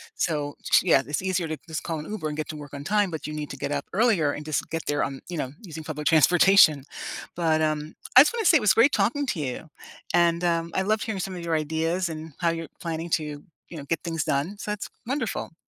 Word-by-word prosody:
So, 150 Hz, -3 st, -1 dB
ch -, -, +4 dB
yeah, 170 Hz, -6 st, +5 dB
it's 145 Hz, -, -2 dB
easier 185 Hz, -2 st, -1 dB
to 155 Hz, 0 st, -4 dB
just 160 Hz, -1 st, -4 dB
call 165 Hz, -2 st, -3 dB
an 150 Hz, -, -8 dB
Uber 210 Hz, -7 st, -3 dB
and 150 Hz, 0 st, -5 dB
get 155 Hz, -, -4 dB
to 155 Hz, -, -5 dB
work 145 Hz, -2 st, -10 dB
on 140 Hz, 0 st, -6 dB
time, 205 Hz, +2 st, +1 dB
but 160 Hz, -, -5 dB
you 155 Hz, -, -5 dB
need 150 Hz, -1 st, -5 dB
to -, -, -7 dB
get -, -, -3 dB
up 140 Hz, -1 st, -2 dB
earlier 195 Hz, -8 st, +3 dB
and 150 Hz, +1 st, -6 dB
just 155 Hz, -1 st, -2 dB
get 165 Hz, -1 st, -4 dB
there 145 Hz, 0 st, +1 dB
on, 135 Hz, -1 st, -4 dB
you 175 Hz, -2 st, -5 dB
know, 130 Hz, -3 st, -3 dB
using 160 Hz, -6 st, -8 dB
public 150 Hz, -1 st, -4 dB
transportation. 165 Hz, -2 st, +6 dB, 0.5 s
But, 160 Hz, -2 st, +1 dB
um, 155 Hz, 0 st, -1 dB, 0.2 s
I 255 Hz, -, +12 dB
just 300 Hz, -, +3 dB
wanna 460 Hz, -2 st, -2 dB
say 330 Hz, -, +7 dB
it 265 Hz, -, -2 dB
was 210 Hz, -, +5 dB
great 245 Hz, +5 st, +5 dB
talking 235 Hz, +9 st, +1 dB
to 175 Hz, -, -1 dB
you, 145 Hz, +2 st, -4 dB, 0.4 s
and, 170 Hz, 0 st, +3 dB
um, 170 Hz, -1 st, 0 dB
I -, -, +2 dB
loved 215 Hz, +2 st, +1 dB
hearing 215 Hz, -4 st, -3 dB
some 190 Hz, 0 st, -4 dB
of 175 Hz, -, -7 dB
your 165 Hz, -1 st, 0 dB
ideas 160 Hz, +4 st, -1 dB
and 160 Hz, -1 st, -7 dB
how 170 Hz, -1 st, +2 dB
you're 165 Hz, -1 st, -3 dB
planning 165 Hz, 0 st, -4 dB
to, 150 Hz, -2 st, -2 dB, 0.3 s
you 170 Hz, -, -8 dB
know, 140 Hz, -, -7 dB
get 165 Hz, +2 st, -1 dB
things 165 Hz, -3 st, -2 dB
done, 145 Hz, +11 st, -1 dB
so, 210 Hz, -, -4 dB
that's 210 Hz, -1 st, -4 dB, 0.2 s
wonderful. 255 Hz, -, -3 dB
165 Hz, 255 wpm, -25 LUFS, 150-190 Hz, 0.5 s, I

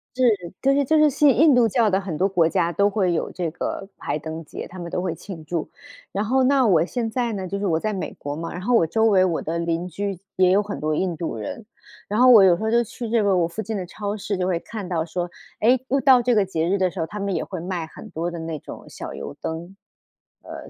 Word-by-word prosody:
是。 255 Hz, -, 0 dB, 0.4 s
就 275 Hz, 0 st, +3 dB
是 280 Hz, 0 st, +2 dB
就 315 Hz, +4 st, +3 dB
是 305 Hz, 0 st, +6 dB
信 285 Hz, -1 st, +4 dB
印 305 Hz, +1 st, +6 dB
度 245 Hz, -2 st, +5 dB
教 225 Hz, +1 st, +2 dB
的 190 Hz, -1 st, +2 dB
很 190 Hz, -6 st, -5 dB
多 190 Hz, -, +2 dB
国 180 Hz, -4 st, +2 dB
家 170 Hz, +1 st, +1 dB
都 200 Hz, +3 st, +2 dB
会 195 Hz, -3 st, +1 dB
有 165 Hz, -, -1 dB
这 170 Hz, -3 st, -3 dB
个 195 Hz, +3 st, -4 dB
排 145 Hz, -, -3 dB
灯 160 Hz, +2 st, -6 dB
节， -, -, -7 dB
他 185 Hz, +2 st, -11 dB
们 170 Hz, -1 st, -6 dB
都 180 Hz, -, -2 dB
会 180 Hz, -3 st, -2 dB
庆 165 Hz, 0 st, -9 dB
祝。 160 Hz, +1 st, -3 dB, 0.4 s
然 200 Hz, -, -1 dB
后 260 Hz, +5 st, +2 dB
那 265 Hz, 0 st, +4 dB
我 170 Hz, -6 st, +4 dB
现 230 Hz, +3 st, -3 dB
在 240 Hz, -1 st, -1 dB
呢， 190 Hz, -2 st, -4 dB
就 200 Hz, +2 st, -3 dB
是 205 Hz, -, -2 dB
我 160 Hz, -3 st, +1 dB
在 215 Hz, +5 st, -2 dB
美 190 Hz, -, -4 dB
国 145 Hz, 0 st, -5 dB
嘛， 165 Hz, +2 st, -5 dB
然 175 Hz, -, -6 dB
后 245 Hz, +6 st, 0 dB
我 165 Hz, -, +4 dB
周 220 Hz, +7 st, +1 dB
围 200 Hz, -4 st, +5 dB
我 170 Hz, -3 st, -1 dB
的 165 Hz, +2 st, -3 dB
邻 170 Hz, +1 st, -1 dB
居 195 Hz, +2 st, -4 dB, 0.2 s
也 185 Hz, -1 st, +5 dB
有 200 Hz, +2 st, +4 dB
很 205 Hz, 0 st, -6 dB
多 155 Hz, 0 st, -1 dB
印 180 Hz, +1 st, -1 dB
度 165 Hz, -6 st, -3 dB
人， 110 Hz, -, -6 dB, 0.4 s
然 210 Hz, +2 st, -1 dB
后 255 Hz, +1 st, +7 dB
我 225 Hz, -5 st, +9 dB
有 185 Hz, -2 st, +6 dB
时 175 Hz, -, -6 dB
候 220 Hz, -, 0 dB
就 235 Hz, +1 st, +4 dB
去 235 Hz, +1 st, -7 dB
这 230 Hz, 0 st, +2 dB
个 200 Hz, -2 st, +2 dB
我 170 Hz, -2 st, +2 dB
附 170 Hz, +6 st, -5 dB
近 220 Hz, 0 st, -4 dB
的 190 Hz, -3 st, -3 dB
超 205 Hz, +3 st, -4 dB
市 205 Hz, -1 st, -3 dB
就 180 Hz, 0 st, -1 dB
会 180 Hz, -2 st, +1 dB
看 210 Hz, 0 st, -7 dB
到 170 Hz, -3 st, -1 dB
说， 175 Hz, +2 st, -4 dB, 0.3 s
哎， 245 Hz, +4 st, +4 dB
又 275 Hz, -, +2 dB
到 260 Hz, -2 st, +6 dB
这 245 Hz, +1 st, +2 dB
个 210 Hz, -3 st, +3 dB
节 165 Hz, -3 st, -1 dB
日 200 Hz, -, +2 dB
的 185 Hz, -1 st, +2 dB
时 180 Hz, -, -8 dB
候， 165 Hz, -, 0 dB
他 210 Hz, +5 st, -7 dB
们 200 Hz, -2 st, -1 dB
也 -, -, -1 dB
会 185 Hz, -, -6 dB
卖 175 Hz, -1 st, -3 dB
很 160 Hz, -, -12 dB
多 170 Hz, +2 st, -3 dB
的 170 Hz, -, -6 dB
那 160 Hz, -1 st, -4 dB
种 -, -, -10 dB
小 -, -, -7 dB
油 -, -, -7 dB
灯， 170 Hz, +4 st, -5 dB, 0.7 s
呃， -, -, -9 dB
190 Hz, 300 characters per minute, -23 LUFS, 170-220 Hz, 0.7 s, 我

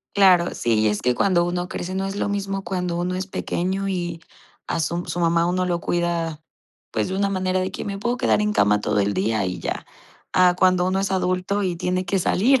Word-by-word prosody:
Claro, 185 Hz, -3 st, +5 dB
sí. 115 Hz, -1 st, 0 dB
Y 110 Hz, -, +3 dB
es 105 Hz, -, -1 dB
que 125 Hz, 0 st, +2 dB
cuando 180 Hz, -3 st, +3 dB
uno 175 Hz, +1 st, -2 dB
crece, 185 Hz, +2 st, -4 dB
no 195 Hz, 0 st, -1 dB
es 195 Hz, -, -4 dB
lo 205 Hz, -, -1 dB
mismo, 195 Hz, -1 st, -2 dB
cuando 180 Hz, -1 st, -2 dB
uno 180 Hz, +1 st, -1 dB
es 190 Hz, 0 st, -3 dB
pequeño, 190 Hz, +1 st, -2 dB
y 175 Hz, -3 st, -3 dB, 0.5 s
a -, -, -1 dB
su 170 Hz, +2 st, -1 dB
su 175 Hz, -, -4 dB
mamá, 170 Hz, 0 st, +3 dB
uno 180 Hz, +1 st, 0 dB
lo 175 Hz, -1 st, -1 dB
cuida, 170 Hz, -2 st, -1 dB, 0.5 s
pues, -, -, 0 dB
de 190 Hz, -, -3 dB
una 200 Hz, 0 st, +1 dB
manera 185 Hz, -1 st, 0 dB
de 185 Hz, +1 st, -2 dB
que: -, -, -5 dB
"Me 200 Hz, -1 st, -4 dB
puedo 240 Hz, +4 st, -1 dB
quedar 220 Hz, -, +2 dB
en 210 Hz, 0 st, +1 dB
cama 105 Hz, -, +3 dB
todo 105 Hz, 0 st, +1 dB
el 100 Hz, +1 st, +1 dB
día, 100 Hz, +2 st, 0 dB
y 90 Hz, -, -3 dB
ya". -, -, -4 dB, 0.5 s
A 180 Hz, -1 st, +5 dB
cuando 185 Hz, -1 st, +3 dB
uno 190 Hz, +1 st, +1 dB
es 195 Hz, -, -1 dB
adulto, 185 Hz, +2 st, 0 dB
y 180 Hz, -2 st, 0 dB
tiene 180 Hz, +2 st, -1 dB
que 190 Hz, +1 st, 0 dB
salir, 245 Hz, +9 st, +3 dB
180 Hz, 235 wpm, -23 LUFS, 170-195 Hz, 0.5 s, Claro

